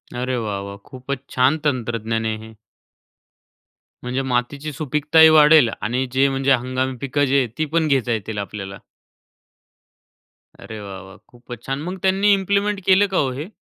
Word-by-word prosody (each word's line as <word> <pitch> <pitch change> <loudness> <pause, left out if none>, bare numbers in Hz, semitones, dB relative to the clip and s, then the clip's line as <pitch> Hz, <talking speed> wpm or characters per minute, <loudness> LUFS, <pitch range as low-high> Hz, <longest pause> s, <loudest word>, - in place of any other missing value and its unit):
अरे! 125 +1 -2
वाह, 105 -4 -3
वाह! 100 0 -8
खूपच 130 +1 -6
छान 130 +4 +2
तंत्रज्ञान 115 -4 -2
आहे 110 -1 -2
हे. 110 +1 -12 1.5
म्हणजे 125 +2 -2
मातीची 135 +4 -2
सुपीकताही 150 +3 +4
वाढेल 155 -4 +6
आणि 125 +4 -1
जे 135 +1 +3
म्हणजे 135 0 0
हंगामी 130 +1 -1
पिकं 140 +1 0
जी 140 +1 +2
आहेत, 125 -4 +1
ती 155 - 0
पण 160 +1 0
घेता 130 -4 +1
येतील 110 -1 -3
आपल्याला? 100 -1 -6 1.8
अरे 110 - -9
वाह, 95 -2 -8
वाह! 95 0 -14
खूपच 120 -1 -12
छान. 135 +2 -4
मग 180 +4 -5
त्यांनी 195 +2 +3
इम्प्लिमेंट 200 +1 0
केलं 195 +2 +4
का 190 - -1
हो 135 - +1
हे? 165 +8 -7
130 Hz, 160 wpm, -21 LUFS, 115-155 Hz, 1.8 s, वाढेल